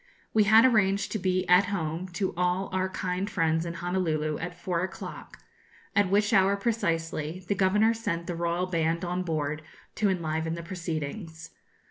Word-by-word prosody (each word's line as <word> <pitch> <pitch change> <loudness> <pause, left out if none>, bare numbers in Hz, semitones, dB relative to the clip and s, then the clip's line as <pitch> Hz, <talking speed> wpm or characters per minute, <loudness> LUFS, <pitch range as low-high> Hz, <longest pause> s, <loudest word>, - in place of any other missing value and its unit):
We 215 -1 +4
had 220 +3 +7
arranged 205 -4 +3
to 215 - -1
be 185 0 0
'at 180 +2 +6
home' 175 -2 -3
to 190 +1 -1
all 180 +2 0
our 185 0 0
kind 185 +1 -2
friends 165 -2 +1
in 170 - -5
Honolulu 170 -4 -1
at 175 +1 -6
four 175 -2 -1
o'clock, 185 - -7 0.6
at 200 -2 +3
which 205 +3 +2
hour 195 -1 +5
precisely 170 -5 -2
the 200 - +2
Governor 210 +4 +3
sent 205 -7 -3
the 175 - -3
Royal 170 +1 -1
band 170 -1 0
on 180 +1 -1
board 155 -3 -2 0.4
to 205 0 +2
enliven 160 -2 -1
the 170 - -6
proceedings. 165 -1 -5
180 Hz, 165 wpm, -28 LUFS, 165-195 Hz, 0.6 s, had